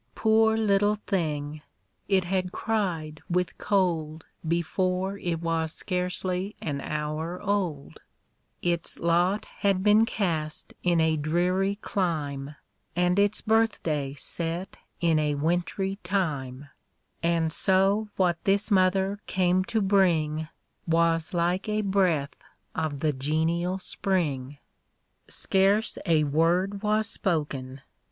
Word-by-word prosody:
Poor 220 0 +3
little 205 -1 +3
thing! 155 -5 -2 0.5
It 195 -2 +3
had 185 0 -1
cried 175 -10 -2
with 180 0 0
cold 165 -6 0 0.2
Before 185 +3 0
it 170 -2 -2
was 165 -1 -1
scarcely 180 +1 -2
an 140 -3 -3
hour 155 +4 -3
old; 190 -8 -2 0.6
Its 170 -1 0
lot 175 +5 +1
had 195 -2 +2
been 215 +2 +5
cast 160 -9 -2
in 175 -2 +2
a 160 -1 +2
dreary 180 +6 +1
clime, 150 -8 -2 0.4
And 180 +2 +2
its 205 +1 +2
birthday 170 -11 +1
set 170 +5 -4 0.3
ip 165 -2 +3
a 150 -1 +1
wintry 175 +5 -1
time; 145 -8 -2 0.5
And 165 -1 +1
so 195 +4 +2
what 175 -3 +1
this 200 +2 +2
mother 190 +1 +3
came 185 0 +2
to 220 +2 0
bring, 165 -6 +2 0.4
Was 165 -1 +2
like 175 +4 0
a 215 0 +1
breath 185 -8 +1 0.4
of 155 -3 -3
the 155 -2 +1
genial 160 +6 0
spring. 150 -8 -2 0.7
Scarce 200 +4 +1
a 160 -2 +4
word 175 +7 +1
was 215 0 +1
spoken. 140 -6 -2
175 Hz, 115 wpm, -27 LUFS, 155-195 Hz, 0.7 s, been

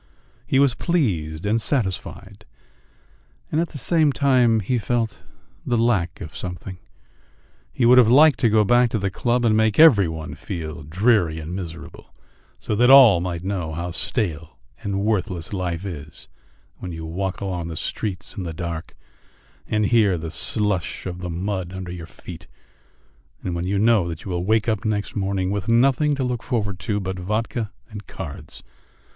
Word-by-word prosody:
He 135 - +2
was 140 -2 +4
pleased 90 - -1
and 110 +3 +1
satisfied, 105 - -3 1.1
and 155 - +1
at 170 - -1
the 150 - -9
same 155 +3 +3
time 125 -5 +3
he 120 +5 0
felt 115 +1 -2 0.4
the 120 - 0
lack 105 -7 0
of 80 -4 -8
something; 90 +1 -7 0.9
he 120 - 0
would 125 +2 +7
have 115 -3 +5
liked 145 +2 +6
to 115 - +3
go 110 0 +4
back 120 +3 +4
to 115 - -1
the 100 -2 -2
club 120 +4 0
and 110 -2 +3
make 110 -1 +2
every 130 - +7
one 80 -1 -6
feel 80 -2 -6
dreary 85 +1 +1
and 80 +3 -6
miserable, 85 -3 -8 0.5
so - - -3
that 125 +2 +4
all 130 -9 +8
might 85 -1 -4
know 90 -5 -3
how 85 +2 -4
stale 85 - -3 0.2
and 100 -1 -2
worthless 100 -5 -2
life 90 -1 -3
is 80 -5 -8 0.5
when 90 - -7
you 80 -1 -7
walk 95 +4 -3
along 90 -4 -3
the 80 - -6
streets 90 +2 -4
in - - -5
the 85 -3 -5
dark 85 -1 -5 0.7
and 105 -1 +1
hear 105 -4 +3
the 80 0 -6
slush 105 -2 -1
of 90 -1 -5
the 90 -1 -5
mud 90 +1 -3
under 95 -1 -6
your 85 -2 -7
feet, 85 -2 -11 1.0
and 90 - -3
when 85 +1 -3
you 100 +1 0
know 105 -3 +3
that 80 -2 -7
you 95 - -5
will 90 0 -2
wake 110 +2 +2
up 110 -3 0
next 105 -2 -2
morning 95 -2 -1
with 100 -2 -3
nothing 135 +5 +3
to 135 - -2
look 125 -2 -2
forward 100 -6 -2
to 105 -2 -2
but 95 -1 -4
vodka 110 +3 -2 0.2
and 105 -3 -10
cards. 75 -4 -9
100 Hz, 175 wpm, -22 LUFS, 85-115 Hz, 1.1 s, all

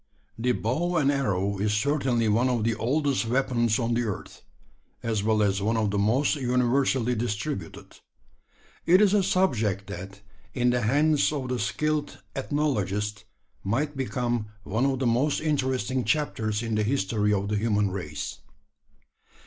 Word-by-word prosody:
The 125 +2 +2
bow 170 +12 -1
and 140 -2 +3
arrow 100 -8 0
is 105 +1 +1
certainly 125 -1 +1
one 115 +5 +2
of 120 -3 0
the 115 +1 +1
oldest 130 +3 0
weapons 120 -2 +1
on 120 -2 0
the 120 - +1
earth 105 -4 -6 0.6
as 110 -3 0
well 110 0 +2
as 100 -1 +1
one 110 +3 +1
of 110 -2 +1
the 100 - 0
most 125 +9 +2
universally 125 -1 +1
distributed. 105 -3 -4 0.9
It 180 +3 +6
is 205 -1 +4
a 205 - +4
subject 110 - +1
that, 95 +1 -8 0.3
in 125 -1 +2
the 125 0 +1
hands 145 +7 +3
of 135 -4 -3
the 125 -1 -1
skilled 150 +2 -1 0.2
ethnologist, 105 -8 -1 0.4
might 145 +9 -1
become 120 -4 -2 0.2
one 120 +5 0
of 135 -1 0
the 130 - -1
most 125 +5 +2
interesting 130 -4 0
chapters 115 -8 -1
in 115 -1 -2
the 105 0 +1
history 105 -3 0
of 100 0 0
the 105 - 0
human 105 -2 +1
race. 75 -6 -5
120 Hz, 155 wpm, -26 LUFS, 105-135 Hz, 0.9 s, It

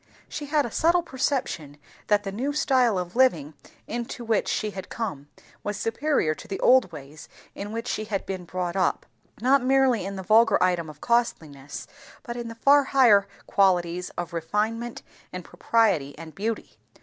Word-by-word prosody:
She 295 - -6
had 295 0 +2
a 235 - -6
subtle 340 +6 +2
perception 255 - -2 0.3
that 205 -1 +3
the 195 - -4
new 260 +8 -2
style 255 -7 +2
of 180 +1 -4
living 165 - +2 0.3
into 235 +1 -5
which 225 -2 +1
she 215 -1 -1
had 190 -1 -8
come 190 -12 -5 0.4
was 205 0 -3
superior 225 - 0
to - - -12
the 195 - -4
old 250 -7 +4
ways 150 0 -11 0.2
in 205 +1 -6
which 230 +1 -4
she 215 - -2
had 205 -2 -3
been 190 -2 -5
brought 180 0 -3
up; 185 -2 0 0.4
not 260 +2 +4
merely 260 -4 +3
in 195 +1 -5
the 190 - -6
vulgar 225 +3 +5
item 175 -3 +1
of 150 -1 -13
costliness, 155 - -1 0.4
but 240 -3 -6
in 240 -1 -5
the 230 - -8
far 280 +4 +5
higher 235 -8 +5 0.2
qualities 180 -2 +1
of 175 -1 -4
refinement 220 +8 -2 0.3
and 180 -1 -7
propriety 195 -12 +1
and 160 0 -10
beauty. 220 +3 -4
210 Hz, 175 wpm, -25 LUFS, 180-240 Hz, 0.4 s, vulgar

